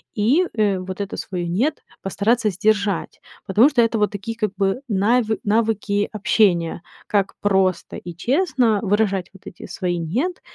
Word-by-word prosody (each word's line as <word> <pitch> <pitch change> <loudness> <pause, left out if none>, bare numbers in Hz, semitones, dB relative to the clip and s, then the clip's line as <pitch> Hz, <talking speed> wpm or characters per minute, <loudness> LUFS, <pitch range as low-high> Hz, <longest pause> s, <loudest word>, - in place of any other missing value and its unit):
И, 245 - +3
э, 205 -4 +1
вот 185 +1 -6
это 200 - -5
свое 180 -3 -4
"нет" 225 - -1 0.2
постараться 215 +4 +1
сдержать, 200 0 0 0.3
потому 220 +8 +5
что 265 -5 +3
это 230 -1 +1
вот 210 - +2
такие 205 +3 -5
как 215 -4 -1
бы 195 +5 0
нави 220 +2 +1
навыки 210 -1 0
общения, 185 -6 +1 0.3
как 200 -2 0
просто 190 -2 +1
и 175 - -8
честно 245 - +1
выражать 200 -3 0
вот 195 - -18
эти - - -10
свои 175 -2 -2
"нет" 250 - -2
205 Hz, 155 wpm, -21 LUFS, 190-225 Hz, 0.3 s, потому